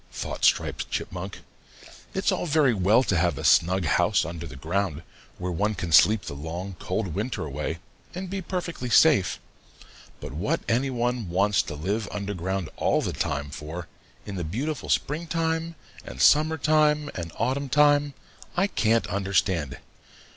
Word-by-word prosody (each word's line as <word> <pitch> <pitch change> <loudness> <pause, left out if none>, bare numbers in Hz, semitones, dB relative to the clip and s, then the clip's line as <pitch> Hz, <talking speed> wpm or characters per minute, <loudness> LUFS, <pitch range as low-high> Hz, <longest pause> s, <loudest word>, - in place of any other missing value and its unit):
thought - - -5
Striped - - +2
Chipmunk. - - -5 0.7
"It's 190 +1 +1
all 180 -1 -1
very 150 -5 +3
well 105 +5 +4
to 100 - 0
have 85 +1 +1
a - - -5
snug 95 +1 +4
house 70 - +2
under 85 0 -6
the 70 - -10
ground, 80 +2 -2 0.3
where 90 0 -3
one 105 +6 0
can 85 -3 -4
sleep 105 +6 +6
the - - -6
long 85 +6 -6
cold 95 +1 -2
winter 105 -2 -3
away 75 +3 -4 0.4
and 185 +1 -4
be 195 +1 -4
perfectly 170 -8 -4
safe, 115 - +4 0.8
but - - -8
what 85 +8 -1
any 125 +4 +1
one 120 -4 -1
wants 100 +3 +2
to 80 - -7
live 100 +8 -2
under 100 0 -3
the 90 - -8
ground 95 -1 -2
all - - +1
the - - -2
time 70 0 -2
for, 80 +4 -7 0.4
in 100 -2 -6
the 90 - -2
beautiful 130 - -3
springtime 165 +1 -1 0.3
and 60 - -9
summertime 150 - +3
and 85 -2 -5
autumntime, 145 +4 +2 0.4
I 185 - +4
can't 115 - +1
understand. 95 -7 0
105 Hz, 155 wpm, -26 LUFS, -, 0.8 s, sleep